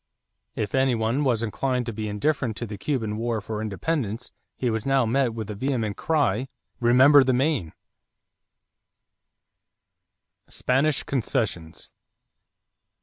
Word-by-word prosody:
If 105 - -3
any 130 -2 +3
one 115 +6 0
was 120 -4 +1
inclined 125 +3 -1
to 115 - -4
be 110 0 -4
indifferent 115 +1 -1
to 120 - -3
the 105 -2 -7
Cuban 110 -5 -2
war 115 0 -1
for 105 +1 -5
independence, 115 +1 -3 0.3
he 125 -2 0
was 110 -1 -2
now 135 -2 +2
met 120 0 +1
by 110 - -3
the 105 0 -6
vehement 110 -2 -2
cry: 135 -6 0 0.3
"Remember 130 +4 +6
the 130 0 +1
Maine!" 125 - 0 2.8
=Spanish 135 +3 +1
Concessions. 110 - -2
120 Hz, 125 wpm, -25 LUFS, 110-135 Hz, 2.8 s, Remember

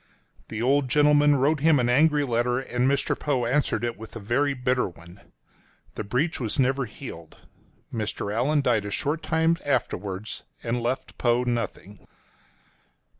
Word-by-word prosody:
The 110 +1 -4
old 135 +1 +2
gentleman 145 +1 +5
wrote 140 +3 +2
him 155 -1 +4
an 120 - +1
angry 150 +4 +4
letter, 120 -1 0
and 125 0 0
Mr. 140 0 +1
Poe 135 -5 -1
answered 120 -3 0
it 120 -2 -3
with 110 +1 -10
a - - -5
very 135 +7 0
bitter 125 -3 0
one. 85 +2 -15 0.7
The - - -4
breach 125 +11 -1
was 115 -5 -2
never 135 0 +2
healed. 105 - -10 0.6
Mr. 105 -2 -3
Allan 140 +6 +2
died 115 -5 +2
a - - -3
short 150 +9 -2
time 165 0 +1
afterwards, 105 -6 -2 0.2
and 120 0 -1
left 125 +3 -3
Poe 120 0 +2
nothing. 115 -4 -4
125 Hz, 155 wpm, -25 LUFS, 115-145 Hz, 0.7 s, gentleman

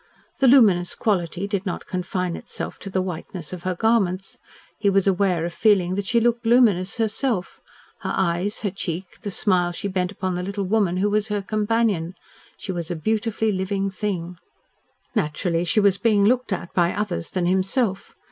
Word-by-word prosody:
The 270 - +4
luminous 200 -9 +5
quality 190 -3 -1
did 200 -2 -2
not 185 -3 -4
confine 180 -1 -2
itself - - -6
to 195 - -7
the 185 -1 0
whiteness 175 -1 -6
of 180 - -6
her 185 0 -2
garments. 195 -3 0 0.4
He 205 - +3
was 195 -1 +3
aware 185 -3 +2
of 170 - -4
feeling 190 -3 +3
that 200 0 -2
she 235 - +3
looked 235 0 +1
luminous 225 -6 +3
herself 220 -2 -1 0.4
her - - -3
eyes, 185 +3 0
her 205 - -1
cheek, 180 -1 -5
the 205 - -4
smile 180 -3 +1
she 200 +4 -4
bent 185 -1 -1
upon 185 -2 -3
the 180 - -2
little 200 +1 -3
woman 190 -3 +1
who 200 +3 +2
was 210 0 +1
her 205 -2 -2
companion. 210 -4 0 0.4
She 190 - -5
was 170 -3 -4
a 175 - -2
beautifully 220 +5 0
living 195 +1 -1
thing. 180 -3 -3 0.8
Naturally, 170 -2 0
she 215 +5 +2
was 200 -2 +3
being 210 -3 +3
looked 250 +1 +2
at 175 -2 -3
by 175 0 +2
others 205 -5 -2
than 185 -2 -1
himself. 190 +3 0
195 Hz, 180 wpm, -23 LUFS, 180-210 Hz, 0.8 s, luminous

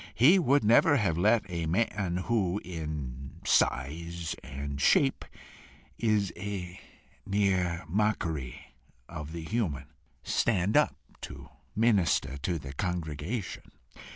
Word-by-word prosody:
He 160 - +6
would 145 -3 +3
never 120 +7 +5
have 100 -9 +1
let 105 +5 +3
a 85 -3 -3
man 90 -1 0
who 105 -5 +1
in 75 -6 -5
size 80 +5 0
and 70 +1 -5
shape 135 - +3 0.8
is 105 -4 +1
a 95 -3 -5 0.4
mere 95 -5 0
mockery 80 - -2 0.3
of 75 0 -7
the 85 0 -6
human, 80 - -2 0.3
stand 100 -3 +1
up - - +4 0.3
to - - -9 0.3
minister 95 - +2
to 85 +4 -1
the 70 -2 -8
congregation. 90 - -4
90 Hz, 110 wpm, -29 LUFS, 75-105 Hz, 0.8 s, He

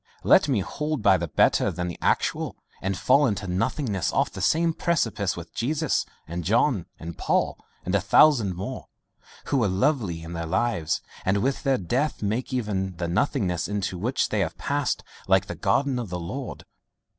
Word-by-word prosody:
Let - - +5
me 120 -7 +2
hold 150 +5 -3
by 100 -3 +6
the 85 -1 -3
better - - +3
than 90 0 -3
the 85 - -6
actual, - - 0 0.3
and 95 0 -1
fall 140 +8 +4
into 100 -3 -2
nothingness 100 - -1
off - - +1
the - - -7
same 165 +1 +2
precipice 115 - 0
with 85 -1 -9
Jesus 150 +5 0 0.2
and 85 +1 -4
John 110 - +2
and 85 0 -8
Paul - - +1 0.3
and - - -2
a - - +3
thousand 115 - +5
more, 95 - -6 0.6
who 140 - 0
were 115 -5 +3
lovely 95 - 0
in 85 +1 -7
their 85 -1 -4
lives, 85 -3 0 0.2
and 100 +2 +1
with 135 +1 0
their 135 -3 +2
death 125 - -1
make 110 +7 -1
even 100 -7 -2
the 85 0 -2
nothingness 90 - 0
into 100 -2 -2
which 125 +8 0
they 105 - 0
have 90 -5 -1
passed 145 -1 -1 0.2
like 95 0 +4
the 105 - -5
garden 130 +6 +1
of 115 -5 -5
the 90 0 -3
Lord. 110 +10 -6
105 Hz, 180 wpm, -25 LUFS, 90-135 Hz, 0.6 s, by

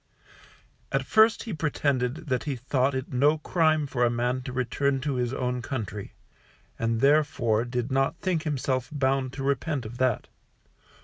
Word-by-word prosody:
At - - 0
first 220 +1 +4
he 225 - -5
pretended 145 -2 -1
that 130 -1 -1
he 145 -3 -1
thought 130 +2 0
it 130 0 -4
no 145 +5 +4
crime 155 -1 +2
for 130 -3 -1
a 120 - +4
man 125 +2 -1
to 130 - -6
return 130 +2 0
to 140 +1 -1
his 125 -2 -1
own 125 -1 -2
country, 105 -5 -5 0.6
and 115 0 0
therefore 135 -6 +3
did 125 +1 -3
not 135 +4 +1
think 180 -4 -1
himself 130 -4 -1
bound 135 -2 0
to 135 - -5
repent 140 0 -1
of 120 +3 -8
that. 130 -3 +1
130 Hz, 165 wpm, -27 LUFS, 125-145 Hz, 0.6 s, first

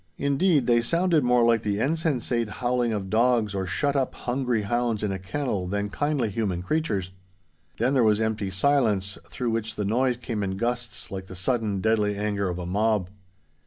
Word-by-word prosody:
Indeed 140 0 +2
they 120 -1 +4
sounded 170 +3 +2
more 125 -1 +4
like 115 -1 +4
the 105 -2 -1
insensate 130 -5 0
howling 120 +1 0
of 100 -3 -3
dogs 115 -2 +2
or 95 -1 -2
shut 140 +9 0
up 135 -2 0
hungry 125 -3 -1
hounds 120 0 -1
in 105 - 0
a 95 - -3
kennel 100 -2 -2
than 100 +2 -2
kindly 145 -6 0
human 95 -5 -2
creatures. 100 - -1 0.7
Then 125 +4 +1
there 130 - +4
was 105 -1 +3
empty 110 -3 -1
silence, 100 -2 +1
through 120 -2 -2
which 115 0 -2
the 105 - -2
noise 125 +4 +1
came 115 -3 -4
in 95 -1 -2
gusts 120 0 -2
like 95 -1 -6
the 95 - -9
sudden, 105 0 -1
deadly 105 -2 +1
anger 100 -2 -1
of 90 - -3
a 90 - -5
mob. 100 0 0
115 Hz, 185 wpm, -25 LUFS, 100-125 Hz, 0.7 s, they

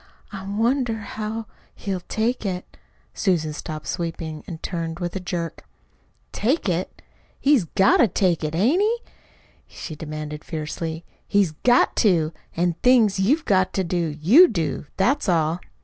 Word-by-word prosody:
"I 195 -1 -7
wonder 230 +4 +1
how 220 +1 -5 0.3
he'll 195 -2 -3
take 225 +7 -2
it." 185 -3 -4 0.4
Susan 165 -6 0
stopped 155 0 -6
sweeping 165 -3 -4
and 160 -3 -8
turned 165 -2 -3
with 175 +1 -4
a - - -1
jerk. 170 -2 -4 0.7
"Take 255 +5 0
it? 180 0 -2 0.4
He's 275 -9 +4
got 190 +4 +4
to 240 - +5
take 180 -3 +1
it, 155 +1 -2
hain't 250 - +3
he?" 445 +3 +2 0.7
she 155 - -8
demanded 150 0 -6
fiercely. 160 +1 -5 0.2
"He's 200 -5 +2
GOT 240 +11 +3
TO! 170 -7 +2 0.2
An' 175 0 +1
things 230 -6 +4
you've 285 +12 +2
got 185 -2 +2
to 190 - 0
do, 170 -4 -2
you 250 - +8
do. 165 - -2
That's 245 +4 +2
all. 165 0 +2
185 Hz, 150 wpm, -23 LUFS, 165-220 Hz, 0.7 s, you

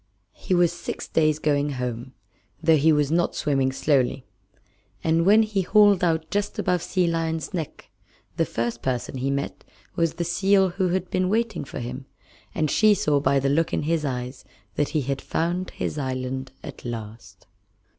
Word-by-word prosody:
He 185 - -1
was 175 -1 +3
six - - -6
days 155 -1 +2
going 145 -1 0
home, 125 0 -4 0.5
though 160 0 +4
he 155 +2 +4
was 150 -1 +2
not 170 +1 +1
swimming 135 -3 +1
slowly; 135 -2 +1 0.8
and 165 +2 +2
when 215 +2 +7
he 210 -3 -1
hauled 205 0 +4
out 160 -2 0
just 205 0 -1
above 180 -2 +1
Sea 180 0 0
Lion's 165 -1 -2
Neck 165 -5 -6 0.4
the - - +2
first 120 0 -3
person 130 0 -2
he 135 +2 -1
met 140 0 -3 0.3
was 165 -1 0
the 175 - -2
seal 190 +2 +3
who 185 +1 -1
had 185 +1 -2
been 185 0 +1
waiting 225 +1 0
for 135 - -8
him, 125 +2 -6 0.5
and 155 -2 0
she 215 -1 +5
saw 150 -5 +1
by 140 0 +2
the 135 +1 0
look 160 +4 +1
in - - 0
his 160 0 0
eyes 125 -2 -4 0.3
that 145 - 0
he 155 - 0
had 135 +1 -3
found 175 +3 -2
his 150 - -4
island 130 -1 -3
at - - -9
last. 110 -4 -8
155 Hz, 175 wpm, -24 LUFS, 130-175 Hz, 0.8 s, when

